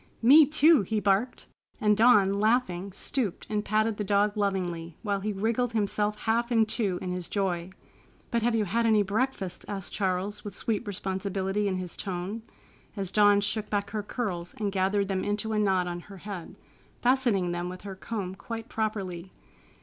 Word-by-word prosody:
"Me, 285 +5 +8
too!" 310 -1 +5
he 215 +3 -1
barked, 205 +5 0 0.3
and 210 -1 +3
Dawn, 210 -3 +5
laughing, 205 -4 +1
stooped 205 +1 -2
and 210 -1 0
patted 215 +1 +1
the 210 - -1
dog 205 +1 +2
lovingly, 180 -5 -2
while 200 -2 0
he 210 +2 -2
wriggled 230 +4 0
himself 210 -1 0
half 235 +2 0
in 225 -2 +4
two 210 -5 -1
in 180 - -3
his 180 -1 -4
joy. 185 -3 -1 0.6
"But 235 - +1
have 235 +1 +2
you 215 -2 +1
had 230 +5 +1
any 215 -2 +4
breakfast?" 200 -2 -2
asked 195 -3 -6
Charles, 190 +1 -1
with 205 -2 -7
sweet 215 -2 -1
responsibility 195 +1 -2
in 190 - 0
his 180 -2 -4
tone, 190 +3 -4 0.6
as 195 -2 -3
Dawn 205 -1 +5
shook 210 +1 -1
back 200 -1 -1
her 215 0 -2
curls 200 -5 -4
and 205 -2 -1
gathered 195 +1 +1
them 190 -1 -1
into 210 +2 -1
a 215 - +1
knot 190 -3 +2
on 175 0 -4
her 195 +3 -12
head, 190 -2 -7 0.5
fastening 240 -8 +2
them 175 +1 -3
with 185 0 -8
her 200 -1 -7
comb 195 -1 -4
quite 225 +3 -7
properly. 195 -5 -3
205 Hz, 180 wpm, -28 LUFS, 190-220 Hz, 0.6 s, Me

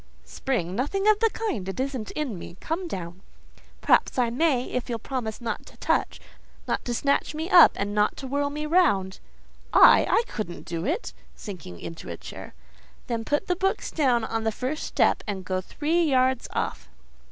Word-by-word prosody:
"Spring? 180 - -2
Nothing 390 - -1
of 425 -1 +5
the 455 - +4
kind: 265 - -3
it 195 - -5
isn't 260 -5 -3
in 265 - -3
me. 170 - -10
Come 345 +3 -3
down." 180 - -6 0.6
"Perhaps - - +3
I 240 -2 +2
may—if 255 -3 0
you'll 235 - -1
promise 225 -2 -4
not 230 -3 -4
to - - -15
touch—not - - -3
to 240 - -2
snatch 280 +3 0
me 320 +5 -4
up, 350 - +9
and 205 +1 -2
not 210 0 +1
to 275 - -7
whirl 285 +2 0
me 300 +1 -4
round." 205 - +2 0.5
"I? - - +7
I 460 - +4
couldn't 205 - -6
do 170 +4 -3
it!" 355 - -2 0.2
(sinking 170 - -9
into 85 -2 -8
a - - -5
chair.) - - -10 0.5
"Then 230 -1 -2
put 295 +9 0
the 360 - 0
books 385 +2 -1
down 255 -7 +2
on 225 0 -2
the 220 - +1
first 255 +7 -3
step, - - +2
and 190 -3 -4
go 185 0 -1
three 320 - 0
yards 260 -3 +2
off. - - -3
250 Hz, 180 wpm, -26 LUFS, 205-305 Hz, 0.6 s, up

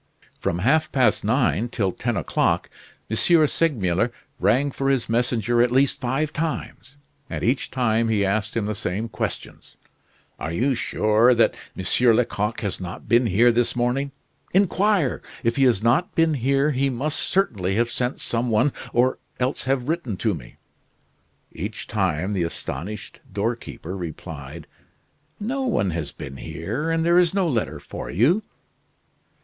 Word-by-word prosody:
From 85 - -1
half 155 +4 +3
past 130 -3 +2
nine 120 +1 +1
till 100 -6 0
ten 120 +4 -2
o'clock - - 0 0.4
M. 110 - -2
Segmuller 125 - +2 0.3
rang 125 +9 +2
for 135 +1 -1
his 135 -4 +1
messenger 120 0 +1
at 120 - +4
least 135 +3 +2
five 135 +4 -1
times, 155 -3 -4 0.3
and - - -4
each 125 +4 +1
time 115 -3 +1
he 105 -3 +2
asked 110 +3 -1
him 110 - 0
the 105 - -1
same 105 +2 -3
questions: - - -5 0.6
"Are 80 - -3
you 125 +11 +1
sure 115 +1 +3
that 115 - +4 0.2
M. 95 - -5 0.3
Lecoq 110 -2 0
has 100 -3 -3
not 90 -1 -7
been 120 +2 +4
here 115 +5 +5
this 120 +1 +1
morning? 125 +3 0 0.4
Inquire! 195 -5 +2 0.2
If 115 0 +1
he 135 - +4
has 115 -5 +3
not 125 +10 +2
been 165 -1 +3
here 140 +2 +2
he 135 0 +1
must 140 +5 0
certainly 100 - 0
have 120 +2 +1
sent 125 +2 -2
some 120 +1 -1
one, 115 +6 +2 0.2
or 125 +2 +2 0.2
else 130 +2 0
have 130 -1 0
written 155 - -2
to 110 0 0
me." 70 -8 -9 1.0
Each - - -6
time 90 +7 -1
the 95 - 0
astonished 85 +4 -5
doorkeeper 105 -4 -3
replied: 80 -3 -7 0.7
"No 250 +6 -2
one 225 - +1
has 80 -2 -3
been 65 0 -8
here, 90 - -4
and 165 0 +1
there 170 +1 +5
is 180 +1 +2
no 190 -3 +2
letter 120 -8 -1
for - - -7
you." 145 - +3
120 Hz, 155 wpm, -23 LUFS, 105-140 Hz, 1.0 s, here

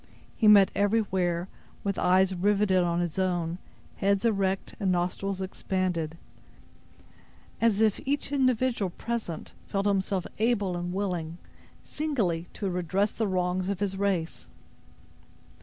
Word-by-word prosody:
He 220 - +2
met 200 -3 +7
everywhere, 190 -4 +1 0.4
with 200 -1 -1
eyes 185 +1 +4
riveted 195 0 +2
on 175 0 +1
his 175 +1 -2
own, 175 -2 -1 0.4
heads 200 +2 +1
erect 195 -3 0
and 195 -3 +1
nostrils 185 +2 -1
expanded, 185 -4 -2 1.4
as 225 -2 +3
if 215 -2 +3
each 285 +1 -1
individual 255 -6 +1
present 220 -3 -5 0.2
felt 195 0 -1
himself 195 -2 +1
able 210 -5 +1
and 175 0 -3
willing, 180 -4 -3 0.5
singly, 205 - -1
to 200 - -3
redress 185 +3 0
the 220 - -1
wrongs 185 0 0
of 200 -3 -2
his 200 -1 -1
race. 190 -4 -1
190 Hz, 125 wpm, -28 LUFS, 180-205 Hz, 1.4 s, met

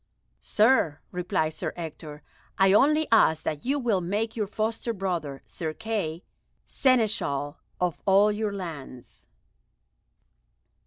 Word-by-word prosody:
"Sir," 210 - +2
replied 180 -3 -1
Sir 155 - -4
Ector, 155 -3 -8 0.3
"I 195 0 +5
only 305 +7 +4
ask 160 -8 +4
that 150 -2 -3
you 275 +4 0
will 230 -8 +1
make 210 +6 -2
your 215 -3 -1
foster 220 +3 -2
brother, 175 -9 -3
Sir 160 -2 -5
Kay, 205 -7 -3 0.4
Seneschal 210 - +1 0.2
of 180 -3 -1
all 200 +2 +5
your 210 0 -2
lands." 160 -10 -8
190 Hz, 115 wpm, -26 LUFS, 160-220 Hz, 0.4 s, I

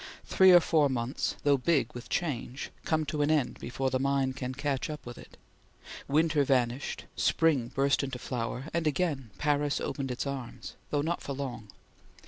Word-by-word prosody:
Three 190 0 +6
or 175 - +9
four 155 -4 +3
months, 125 +1 -2
though 145 -1 +4
big 135 -3 +1
with 120 0 -9
change, 140 -5 -3
come 155 -1 +1
to 150 0 -2
an 145 - +2
end 150 -5 +1
before 130 +2 -2
the 130 - +1
mind 135 -1 +1
can 130 -1 -4
catch 140 0 -2
up 150 -1 -6
with 120 0 -7
it. - - -14 0.7
Winter 155 +1 +3
vanished; 130 -1 0
spring 150 -8 +2
burst 135 +2 +1
into 135 -2 -3
flower; 125 0 -3
and 165 -1 0
again 145 -6 -1
Paris 145 0 +1
opened 135 -2 -3
its 125 +2 -3
arms, 135 -4 -6 0.2
though 145 -1 0
not 170 +2 -1
for 140 - -4
long. 125 -5 -5
140 Hz, 175 wpm, -29 LUFS, 130-150 Hz, 0.7 s, or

